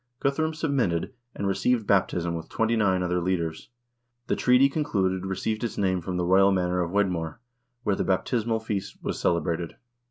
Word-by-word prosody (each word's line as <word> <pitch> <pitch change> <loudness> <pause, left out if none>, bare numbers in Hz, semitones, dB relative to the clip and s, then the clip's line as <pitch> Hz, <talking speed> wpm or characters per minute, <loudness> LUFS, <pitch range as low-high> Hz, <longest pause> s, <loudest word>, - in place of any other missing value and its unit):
Guthrum 155 +3 0
submitted, 130 - 0 0.2
and 100 - -3
received 105 +4 +1
baptism 90 -4 +1
with 85 -1 -6
twenty 115 +1 +1
nine 95 -4 +2
other 90 0 0
leaders. 85 -3 -2 0.6
The - - 0
treaty 125 +2 +5
concluded 95 - -1
received 110 +4 -2
its 115 - -3
name 95 -2 +1
from 90 +1 -3
the 90 - 0
royal 95 +2 +5
manor 90 -1 +1
of 85 - -1
Wedmore, 90 -3 -1 0.4
where 100 - +1
the - - -1
baptismal 110 +3 0
feast 105 -3 -4
was - - -3
celebrated. 85 0 0
95 Hz, 165 wpm, -26 LUFS, 90-110 Hz, 0.6 s, treaty